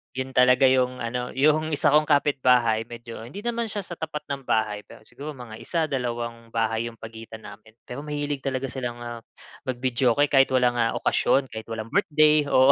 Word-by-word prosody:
‘Yon 130 Hz, 0 st, -3 dB
talaga 125 Hz, +1 st, +4 dB
yung 125 Hz, -1 st, +1 dB
ano, 125 Hz, +1 st, -3 dB
yung 155 Hz, +3 st, +3 dB
isa 145 Hz, -, +3 dB
kong 150 Hz, +1 st, +4 dB
kapitbahay 125 Hz, -6 st, +3 dB
medyo 115 Hz, -1 st, -9 dB
hindi 200 Hz, +11 st, -9 dB
naman 235 Hz, -1 st, -1 dB
siya 205 Hz, -1 st, -2 dB
sa 175 Hz, -, -8 dB
tapat 155 Hz, -2 st, -4 dB
ng 135 Hz, -2 st, -5 dB
bahay, 105 Hz, -2 st, +1 dB
pero -, -, -15 dB
siguro 145 Hz, +6 st, -8 dB
mga 120 Hz, -4 st, -10 dB
isa, 165 Hz, -2 st, -1 dB
dalawang 120 Hz, -3 st, -3 dB
bahay 115 Hz, 0 st, 0 dB
yung 115 Hz, -, -9 dB
pagitan 110 Hz, 0 st, -10 dB
namin. 110 Hz, +2 st, -13 dB
Pero 125 Hz, -, -7 dB
mahilig 145 Hz, -1 st, -3 dB
talaga 130 Hz, -1 st, -3 dB
silang, 125 Hz, -3 st, -4 dB
ah, 120 Hz, -1 st, -6 dB, 0.5 s
mag-videoke 130 Hz, +2 st, +1 dB
kahit 135 Hz, -1 st, +6 dB
walang, 125 Hz, -1 st, +2 dB
ah, 115 Hz, -1 st, +1 dB
okasyon 135 Hz, -2 st, +1 dB
kahit 110 Hz, 0 st, -7 dB
walang 115 Hz, 0 st, -6 dB
birthday, 155 Hz, -6 st, +4 dB
oo. 130 Hz, 0 st, +6 dB
125 Hz, 185 wpm, -25 LUFS, 115-145 Hz, 0.5 s, kahit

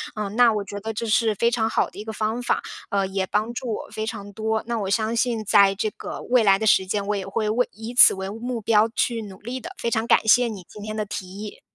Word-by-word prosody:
嗯， 210 Hz, -2 st, -4 dB
那 240 Hz, -2 st, +6 dB
我 210 Hz, -1 st, -2 dB
觉 200 Hz, +1 st, -7 dB
得 220 Hz, +2 st, -5 dB
这 225 Hz, +2 st, -3 dB
是 220 Hz, -1 st, +2 dB
非 235 Hz, +4 st, +2 dB
常 230 Hz, -2 st, +1 dB
好 -, -, +1 dB
的 -, -, -12 dB
一 -, -, -5 dB
个 220 Hz, -, -6 dB
方 220 Hz, +3 st, -2 dB
法， -, -, 0 dB, 0.3 s
呃， 200 Hz, -1 st, +1 dB
也 190 Hz, 0 st, -2 dB
帮 215 Hz, +4 st, -1 dB
助 240 Hz, -2 st, -4 dB
我 -, -, -6 dB
非 220 Hz, -, -4 dB
常 205 Hz, -2 st, -6 dB
多， 220 Hz, +1 st, -1 dB
那 235 Hz, -1 st, -1 dB
我 195 Hz, -2 st, -3 dB
相 220 Hz, +3 st, 0 dB
信 235 Hz, -2 st, 0 dB
在 200 Hz, 0 st, +5 dB
这 215 Hz, +2 st, -1 dB
个 -, -, -8 dB
未 250 Hz, -2 st, +3 dB
来 195 Hz, -2 st, +5 dB
的 220 Hz, -, -1 dB
时 190 Hz, -2 st, +4 dB
间， 200 Hz, +1 st, -2 dB
我 210 Hz, -, 0 dB
也 195 Hz, -2 st, -4 dB
会 210 Hz, +2 st, -2 dB
为 245 Hz, +3 st, +1 dB
以 225 Hz, +3 st, -8 dB
此 245 Hz, -, +8 dB
为 190 Hz, 0 st, -5 dB
目 235 Hz, +3 st, -4 dB
标 215 Hz, +1 st, +3 dB
去 235 Hz, -2 st, 0 dB
努 195 Hz, -2 st, -11 dB
力 245 Hz, +5 st, -5 dB
的， 345 Hz, +7 st, -9 dB
非 235 Hz, -, -1 dB
常 220 Hz, 0 st, 0 dB
感 220 Hz, -, +3 dB
谢 240 Hz, +3 st, +5 dB
你 205 Hz, -5 st, -7 dB
今 210 Hz, -, -11 dB
天 215 Hz, 0 st, -5 dB
的 215 Hz, -1 st, -2 dB
提 200 Hz, -1 st, -5 dB
议。 200 Hz, +3 st, -9 dB
215 Hz, 295 characters per minute, -23 LUFS, 205-230 Hz, 0.3 s, 此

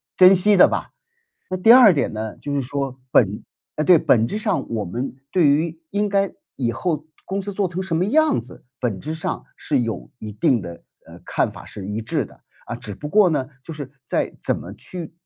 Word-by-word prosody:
珍 185 Hz, +1 st, +8 dB
惜 205 Hz, +3 st, +4 dB
的 180 Hz, -, +8 dB
吧。 -, -, -4 dB, 0.6 s
那 185 Hz, -, -1 dB
第 205 Hz, +5 st, +6 dB
二 245 Hz, -5 st, +9 dB
点 145 Hz, -, 0 dB
呢， 110 Hz, 0 st, -5 dB
就 145 Hz, -, -4 dB
是 140 Hz, -, 0 dB
说， 135 Hz, 0 st, -3 dB
本 105 Hz, -4 st, +2 dB, 0.3 s
呃， 150 Hz, -, -1 dB
对， 175 Hz, +1 st, +7 dB
本 115 Hz, -6 st, +3 dB
质 210 Hz, -, -3 dB
上 215 Hz, -3 st, -1 dB
我 110 Hz, -3 st, -2 dB
们 120 Hz, +9 st, -4 dB, 0.2 s
对 175 Hz, -5 st, +4 dB
于 160 Hz, +3 st, +1 dB
应 205 Hz, +1 st, 0 dB
该 195 Hz, -1 st, +1 dB, 0.2 s
以 120 Hz, -4 st, -1 dB
后 150 Hz, +5 st, -2 dB, 0.2 s
公 195 Hz, +1 st, -3 dB
司 200 Hz, +1 st, -4 dB
做 200 Hz, 0 st, 0 dB
成 180 Hz, +1 st, -4 dB
什 180 Hz, -4 st, -2 dB
么 175 Hz, -, +2 dB
样 310 Hz, -, +3 dB
子， 120 Hz, +3 st, -9 dB
本 115 Hz, -8 st, -2 dB
质 155 Hz, +2 st, -4 dB
上 160 Hz, -, -4 dB
是 140 Hz, -4 st, 0 dB
有 115 Hz, -6 st, -4 dB
一 110 Hz, -, -7 dB
定 110 Hz, +4 st, +2 dB
的 85 Hz, -2 st, -9 dB, 0.2 s
呃， -, -, -13 dB
看 -, -, 0 dB
法 -, -, -11 dB
是 100 Hz, -, -9 dB
一 105 Hz, +2 st, -3 dB
致 110 Hz, -, -1 dB
的。 -, -, -17 dB, 0.3 s
啊， -, -, -4 dB
只 105 Hz, -, -7 dB
不 150 Hz, -, -7 dB
过 205 Hz, +3 st, +5 dB
呢， 135 Hz, -5 st, -1 dB, 0.2 s
就 165 Hz, -, -7 dB
是 145 Hz, -3 st, -7 dB, 0.2 s
在 -, -, -1 dB
怎 -, -, 0 dB
么 -, -, -8 dB
去 175 Hz, -3 st, -8 dB
150 Hz, 235 characters per minute, -22 LUFS, 120-185 Hz, 0.6 s, 二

